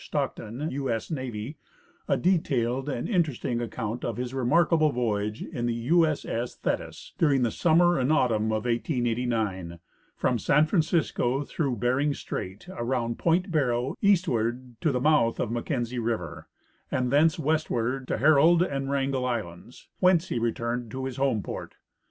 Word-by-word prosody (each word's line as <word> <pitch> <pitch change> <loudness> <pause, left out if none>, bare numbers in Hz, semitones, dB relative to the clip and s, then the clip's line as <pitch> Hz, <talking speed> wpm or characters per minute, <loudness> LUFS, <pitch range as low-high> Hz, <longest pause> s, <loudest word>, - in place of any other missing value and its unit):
Stockton, 120 +9 -3
U 135 0 -3
S 115 +7 -3
N, 130 -3 -4 0.5
a - - +2
detailed 135 -7 0
and 120 - -3
interesting 145 - 0
account 115 0 -4
of 115 -2 -3
his 125 0 -4
remarkable 155 +4 +3
voyage 110 -4 -1
in 120 -1 -3
the 120 - 0
U 160 +8 +3
S 155 -2 -2
S 120 +2 -3
Thetis, - - -4
during 140 -5 +3
the 115 - +1
summer 175 +2 +3
and 130 +3 +1
autumn 120 -8 +2
of 110 +1 -1
1889, 115 - -1 0.4
from 125 -2 0
San 150 +8 +4
Francisco 155 -6 +1
through 140 -3 -2
Bering 130 +6 +1
strait, 95 - -6
around 120 -6 -2
point 175 +3 +1
Barrow, 125 -5 0
eastward 130 - +1
to 155 - +2
the 125 - 0
mouth 130 -5 +3
of - - -1
Mackenzie 120 0 -2
river, 110 -8 -3 0.4
and 125 -1 0
thence 155 +4 +4
westward 135 -5 -1
to - - -1
Herald 155 +6 +5
and 135 -4 -3
Wrangell 135 -2 0
islands, 115 -2 -5
whence 185 -1 +3
he - - -1
returned 120 +1 -2
to 130 +3 -5
his 130 -1 -5
home 135 -7 +1
port. - - -7
125 Hz, 155 wpm, -27 LUFS, 115-155 Hz, 0.5 s, Herald